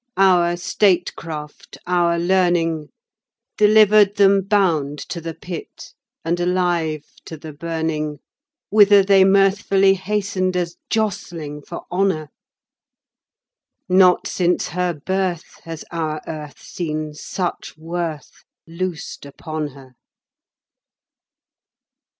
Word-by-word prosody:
Our 175 -3 +4
statecraft, 170 -5 -1
our 175 -1 +2
learning. 170 -3 +1 0.7
Delivered 210 -1 +5
them 200 -1 +5
bound 175 -8 +1
to 170 - -5
the 165 0 -6
Pit 175 +1 -9 0.3
and 170 +1 0
alive 175 -4 0 0.2
to 160 - -8
the 155 0 -10
burning 160 -1 -3 0.5
Whither 205 -1 +6
they 195 0 +5
mirthfully 195 0 +4
hastened 190 -1 -1
as 175 -1 -2
jostling 175 -9 -3
for 170 - -8
honour. 180 -5 0 1.6
Not 185 0 +4
since 180 -1 0
her 180 -1 -1
birth 185 +2 -3
has 165 -1 -7
our 160 -2 -2
Earth 150 -2 -8
seen 155 -3 -5
such 175 +2 -5
worth 165 -1 -5 0.2
loosed 170 -1 -5
upon 155 +2 -5
her. 135 -2 -15
175 Hz, 95 wpm, -20 LUFS, 155-190 Hz, 1.6 s, Whither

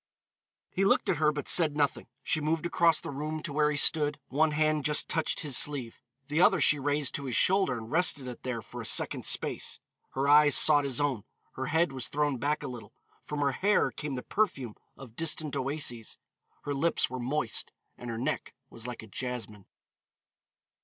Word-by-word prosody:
He 195 - -1
looked 195 - +2
at 175 - +1
her 150 0 +2
but 145 -1 -6
said 155 -4 +4
nothing. 145 -2 -1 0.2
She 155 - 0
moved 160 +2 -1
across 170 -1 +2
the - - -7
room 155 +2 -5
to 145 - -6
where 150 0 +2
he 150 - -2
stood; 150 -1 +4
one 155 +4 +2
hand 155 0 0
just 150 +2 +2
touched 160 - -1
his 145 -5 -1
sleeve, 130 -5 0 0.3
the 150 +3 0
other - - +4
she 150 - +4
raised 145 +1 +1
to 140 - -4
his 125 -3 -3
shoulder 190 -9 +2
and 110 +1 -9
rested 160 -5 +3
it 125 -2 -8
there 120 -3 -5
for - - -9
a - - -8
second's - - +1
space. - - -1 0.3
Her 135 +1 -1
eyes 145 -1 +6
sought 145 -2 +6
his 130 -3 -1
own, 140 -8 -1 0.3
her 130 - -5
head 160 0 +1
was 130 -3 -2
thrown 145 -3 -1
back 150 +4 -1
a - - -4
little, 125 -3 -10 0.3
from 150 -1 -4
her 140 -1 +2
hair 205 +9 +1
came 150 -2 -6
the 125 - -6
perfume 135 - -2 0.2
of 125 -4 -13
distant 155 -1 0
oases, 130 -5 -3 0.5
her 145 - -3
lips 165 +5 0
were 130 - -5
moist 125 -1 -2 0.2
and 120 - -9
her 115 - -4
neck 120 - -4 0.2
was 115 +1 -8
like 125 -2 -7
a - - -12
jasmine. 110 -4 -6
145 Hz, 200 wpm, -28 LUFS, 130-155 Hz, 0.5 s, eyes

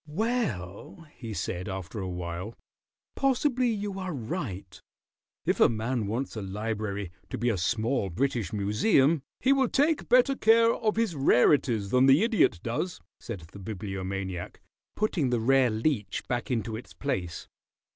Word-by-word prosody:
"Well," 150 - -3
he 115 -3 -7
said, 95 -2 -3
after 95 +3 -5
awhile, 90 +2 -5 0.6
"possibly 255 -2 +2
you 205 -3 -3
are 185 -4 -4
right. 110 - -5 0.6
If - - +1
a - - +6
man 115 0 -2
wants 120 +6 -3
a 110 - -4
library 100 -1 -3 0.2
to - - -4
be 120 +2 +1
a 110 - 0
small 110 +3 0
British 115 0 -1
Museum 135 - +3
" - - -66
"He 265 +2 +4
will 265 -3 +2
take 300 +3 +1
better 255 +2 +5
care 230 -1 +5
of 215 -2 0
his 225 -6 0
rarities 125 -6 +3
than 125 +1 +5
the 135 +8 +6
Idiot 220 - +2
does," 120 +10 -2 0.2
said 105 -7 -6
the 100 - -11
Bibliomaniac, 95 -2 -5 0.4
putting 180 -10 0
the 120 -1 +1
rare 130 +2 +4
Leech 110 0 -1
back 120 -3 -2
into 115 -3 -1
its 115 - -9
place. 90 -12 -3
120 Hz, 150 wpm, -28 LUFS, -, 0.6 s, a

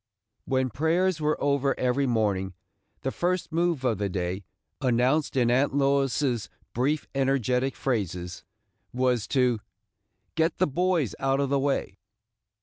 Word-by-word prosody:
When 130 -2 0
prayers 165 - +1
were 150 0 +1
over 140 -1 +1
every 130 +2 +1
morning, 100 -6 0 0.5
the 135 - -2
first 180 +2 -1
move 165 -4 0
of 115 -5 +1
the 100 -1 -1
day, 90 +1 -3 0.4
announced 130 +4 +2
in 120 -2 +3
Aunt 135 +2 +2
Lois's 135 -5 +1 0.2
brief 140 +6 0
energetic 135 -1 +1
phrases, 90 -8 -3 0.5
was 125 -3 +1
to 125 -4 +2 0.7
"get 165 +1 +1
the 185 - +3
boys 170 - 0
out 135 0 +1
of 140 -1 0
the 140 0 +2
way." 135 -8 -1
135 Hz, 135 wpm, -27 LUFS, 120-145 Hz, 0.7 s, in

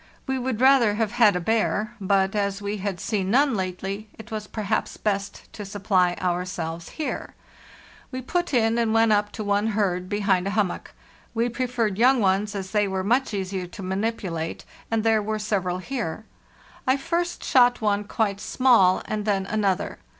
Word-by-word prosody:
We 265 -1 -1
would 250 -3 -2
rather 260 -6 +5
have 220 -1 0
had 215 -5 +4
a - - +1
bear, 215 +2 0
but 195 0 +2
as 200 -1 0
we 205 +1 -3
had 195 -2 -3
seen 195 -4 -1
none 275 +4 +4
lately 195 +2 -4
it 225 +1 -12
was 215 -1 -4
perhaps 210 -3 -2
best 200 -1 -2
to 210 - -7
supply 190 -3 +1
ourselves 175 -2 -3
here. 310 - -4 0.7
We 255 -1 -6
put 350 +6 -1
in, 230 -2 +2
and 225 -1 +1
went 225 0 +4
up 205 0 +2
to 215 - -4
one 205 +1 +1
herd 180 -3 0
behind 195 -3 +1
a 200 - -2
hummock. 200 -4 -1 0.4
We 230 +2 +1
preferred 235 -4 -1
young 255 +2 +5
ones, 205 +1 +1
as 190 -1 -5
they 210 -1 +2
were 190 -1 -2
much 245 +6 +1
easier 190 -2 -3
to 185 +2 -9
manipulate; 190 -4 -3 0.2
and 225 -1 0
there 225 -1 +3
were 215 +1 -2
several 195 -4 -1
here. 220 -2 -4 0.6
I 260 +1 +4
first 345 +5 -2
shot 245 -1 +4
one 210 -1 0
quite 205 -2 -1
small, 230 -8 +4
and 215 -1 -3
then 195 -2 +1
another. 200 -2 -1
210 Hz, 175 wpm, -24 LUFS, 190-225 Hz, 0.7 s, rather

